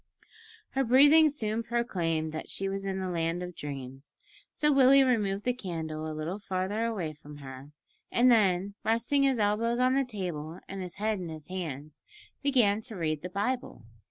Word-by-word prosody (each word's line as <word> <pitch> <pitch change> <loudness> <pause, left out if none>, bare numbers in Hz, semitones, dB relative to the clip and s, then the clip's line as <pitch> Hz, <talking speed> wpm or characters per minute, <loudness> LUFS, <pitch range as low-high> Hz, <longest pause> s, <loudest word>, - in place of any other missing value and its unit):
Her 270 - -1
deep 250 - -2
breathing 290 +5 +7
soon 225 -6 -2
proclaimed 175 -10 -1
that 155 - -6
she 195 - -3
was 195 0 -3
in 190 -1 -2
the 190 - -3
land 170 0 -1
of 180 -1 -7
dreams, 135 -1 -8 0.4
so 300 0 +2
Willie 275 0 +7
removed 210 -6 +1
the 250 - +1
candle 160 -8 -5
a 155 - -6
little 165 +6 -4
further 200 +3 -2
away 190 -9 -2
from 150 0 -13
her, 135 0 -10 0.4
and 245 +1 +5
then, 200 -3 +3
resting 230 +5 +1
his 270 -2 +3
elbows 225 +3 +1
on 255 +1 +3
the 275 +1 +3
table 175 - -5
and 195 0 -6
his 180 -2 -7
head 215 0 -1
in 175 -2 -5
his 155 0 -9
hands, 155 -5 -6 0.4
began 235 -7 +3
to 220 -1 -7
read 155 -4 -2
the 180 - -5
Bible. 205 - -3
195 Hz, 185 wpm, -29 LUFS, 160-235 Hz, 0.4 s, breathing